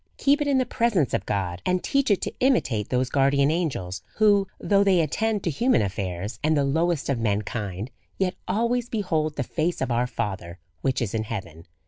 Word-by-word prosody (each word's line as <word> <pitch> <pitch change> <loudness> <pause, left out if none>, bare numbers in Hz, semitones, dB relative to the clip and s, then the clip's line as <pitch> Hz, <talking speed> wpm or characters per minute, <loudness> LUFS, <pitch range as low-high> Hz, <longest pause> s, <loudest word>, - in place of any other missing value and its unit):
Keep 285 +2 +3
it 295 - 0
in 280 -2 +3
the 255 - +2
presence 215 - +1
of 95 - -1
God, 95 -3 -2
and 180 0 0
teach 275 -2 +1
it 205 - +2
to - - -2
imitate 135 - +1
those 130 0 0
guardian 140 +1 +3
angels, 115 - -2
who, 205 -2 +4
though 200 -1 +3
they 190 -3 +4
attend 210 +6 0
to 170 - 0
human 235 - +2
affairs, 95 +1 -4
and 155 0 +3
the 140 - +3
lowest 160 +2 0
of 140 -4 0
mankind, 105 0 -2 0.3
yet 190 -1 0
always 235 +5 0
behold 160 -8 -1
the 140 - -1
face 165 +6 -1
of 130 -2 -1
our 120 +1 +1
Father 95 -7 -4 0.2
which 130 +2 0
is 105 - -4
in 110 -1 -1
heaven. 90 -7 -7
145 Hz, 195 wpm, -25 LUFS, -, 0.3 s, who